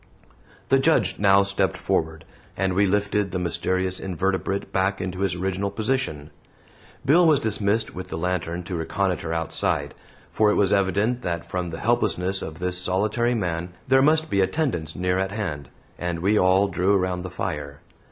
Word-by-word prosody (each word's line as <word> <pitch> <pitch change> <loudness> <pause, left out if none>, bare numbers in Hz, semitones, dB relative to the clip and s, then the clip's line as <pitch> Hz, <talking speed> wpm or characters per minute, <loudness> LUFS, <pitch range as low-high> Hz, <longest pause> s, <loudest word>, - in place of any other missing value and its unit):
The 135 - +5
Judge 135 - +2
now 100 0 +5
stepped 100 -2 0
forward, 80 0 -1 0.3
and 95 0 0
we 100 +2 +3
lifted 100 0 0
the 90 - -3
mysterious 90 +2 -1
invertebrate 95 +1 -2
back 95 +1 +1
into 90 0 -4
his 95 -2 0
original 95 +2 -2
position. 105 - -2 0.7
Bill 170 +5 +5
was 150 -3 +5
dismissed 110 0 0
with 90 +1 -7
the - - -5
lantern 90 0 -2
to 90 +1 -5
reconnoiter 85 0 -1
outside, 80 -1 -1 0.4
for 110 -1 +3
it - - +2
was 100 -1 +3
evident 100 +5 +1
that 85 -4 -3
from 90 -1 -3
the 80 - -6
helplessness 100 -5 0
of 80 0 -6
this 90 +1 -1
solitary 105 +6 0
man 90 -4 -3
there 135 +1 +5
must 155 +3 +3
be 100 -10 +1
attendants 95 - -1
near 90 +1 0
at 95 0 -1
hand, 75 - -4 0.3
and 85 -1 -3
we 100 +4 +2
all 95 0 +4
drew 95 +2 +1
around 90 -1 0
the 90 - -6
fire. 75 -6 -5
95 Hz, 170 wpm, -24 LUFS, 90-105 Hz, 0.7 s, The